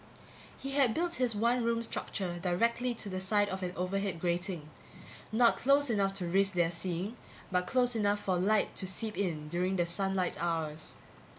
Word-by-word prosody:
He 275 - -5
had 275 -5 +3
built 345 +1 0
his 240 -3 +2
one 235 +3 +2
room 230 0 +1
structure 185 -5 -3
directly 235 +7 +1
to 220 - -2
the 185 -1 -3
side 205 +2 +2
of 190 0 -4
an 180 -1 -2
overhead 190 0 -2
grating 175 -2 -2 0.6
not 235 +1 +4
close 280 0 +3
enough 195 -2 +1
to 190 -2 -2
risk 195 +3 +2
their 170 -2 +2
seeing 180 +2 -2
it, - - -10 0.4
but 180 0 +1
close 250 -2 +3
enough 205 -1 +2
for 185 -2 0
light 210 +3 +2
to 190 - -1
seep 210 +4 -3
in 160 -6 -2
during 180 +4 0
the 175 -2 +2
sunlight 185 -1 -1
hours. 160 -2 -3
195 Hz, 185 wpm, -32 LUFS, 175-230 Hz, 0.6 s, not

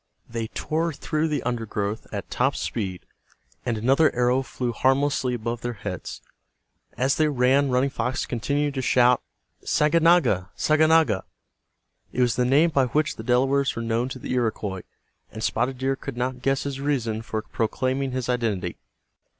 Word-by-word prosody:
They 115 -1 -4
tore 160 +7 -2
through 155 +3 -1
the 150 -4 -2
undergrowth 110 -3 -3
at - - -6
top - - +1
speed 95 -5 -3 0.7
and 115 -2 0
another 135 +8 +4
arrow 125 +2 +2
flew 125 -1 -3
harmlessly 130 +1 +1
above 115 0 -4
their 120 0 -3
heads. 100 -4 -6 0.8
As 130 +3 +1
they 155 - +3
ran 135 0 +3
Running 130 +2 +2
Fox 125 +2 -2
continued 140 +5 -1
to 135 - -2
shout, 125 -1 +4 0.4
"Saganaga! 150 - +3
Saganaga!" 155 -8 +3 0.9
It 125 - -1
was 120 -2 +2
the 125 - +1
name 150 +7 +4
by 135 -4 +2
which 150 +5 0
the 110 - -6
Delawares 135 +3 +2
were 115 - -3
known 115 +2 0
to 130 - -6
the 130 - -5
Iroquois, 110 -6 -1 0.5
and 110 0 -7
Spotted 125 +3 0
Deer 135 +1 0
could 120 - -7
not 125 0 -2
guess 135 +1 +1
his 140 -1 -4
reason 120 -6 -1
for 110 -1 -4
proclaiming 130 +5 -1
his 130 -1 -3
identity. 110 -8 -1
125 Hz, 160 wpm, -25 LUFS, 115-140 Hz, 0.9 s, another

